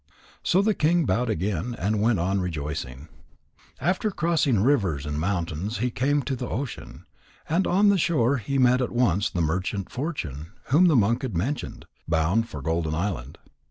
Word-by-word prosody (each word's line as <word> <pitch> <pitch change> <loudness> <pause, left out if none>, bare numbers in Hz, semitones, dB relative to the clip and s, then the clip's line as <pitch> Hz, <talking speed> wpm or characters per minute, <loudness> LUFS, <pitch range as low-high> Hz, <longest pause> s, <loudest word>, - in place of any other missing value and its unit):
So 190 +3 +2
the 215 +1 +3
king 165 -1 +2
bowed 120 +4 0
again 100 +3 -2
and 105 +2 0
went 115 0 +3
on 95 +3 0
rejoicing. 75 -5 -5 0.7
After 180 +9 0
crossing 160 - +1
rivers 100 - +1
and 75 0 -3
mountains 90 +3 -2
he 125 +3 -1
came 140 +4 +1
to 135 +1 -2
the 125 0 -5
ocean. 130 +1 -6 0.4
And 175 +4 +1
on 200 +3 +4
the 200 -2 +3
shore 140 -5 +2
he 135 +4 -2
met 125 0 +4
at 125 - -1
once 105 -6 +2
the 90 - -2
merchant 90 +4 -2
Fortune 90 - -5 0.2
whom 160 +7 +5
the 160 - +4
monk 115 +2 +3
had 125 - -3
mentioned, 130 - -3 0.2
bound 85 +8 +1
for 70 -3 -7
Golden 80 -1 -1
Island. 85 -8 -3
110 Hz, 170 wpm, -25 LUFS, 85-140 Hz, 0.7 s, whom